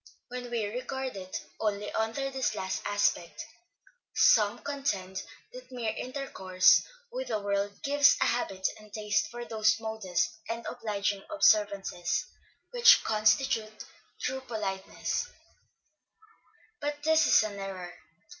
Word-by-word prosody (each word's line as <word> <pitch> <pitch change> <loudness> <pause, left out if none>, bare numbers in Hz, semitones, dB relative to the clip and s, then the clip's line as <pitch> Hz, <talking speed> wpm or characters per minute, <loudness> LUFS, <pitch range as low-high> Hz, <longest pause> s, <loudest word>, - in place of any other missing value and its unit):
When 245 0 -6
we 235 -3 -1
regard 255 +3 -4
it 185 -1 -6
only 210 -1 -1
under 225 +5 -1
this 265 -4 -1
last 190 -2 -3
aspect, 175 -6 0 0.7
some 210 +1 +5
contend 200 -10 -2 0.3
that 250 +1 -11
mere 235 -4 -2
intercourse 190 -9 +3 0.3
with - - -4
the 215 - -1
world 200 0 -1
gives 285 0 +5
a - - +3
habit 195 -6 0
and 215 -1 -16
taste 210 -1 0
for 240 +1 -7
those 215 -2 +2
modest 220 -2 -2
and 230 +1 -4
obliging 205 -4 -2
observances 205 - +2 0.5
which 485 -1 +7
constitute 215 0 +1 0.3
true 265 +1 -2
politeness; 210 - -3 1.5
but 290 0 -4
this 320 +1 +4
is - - +6
an 205 -2 -5
error. 185 -2 -6
220 Hz, 120 wpm, -29 LUFS, 200-255 Hz, 1.5 s, which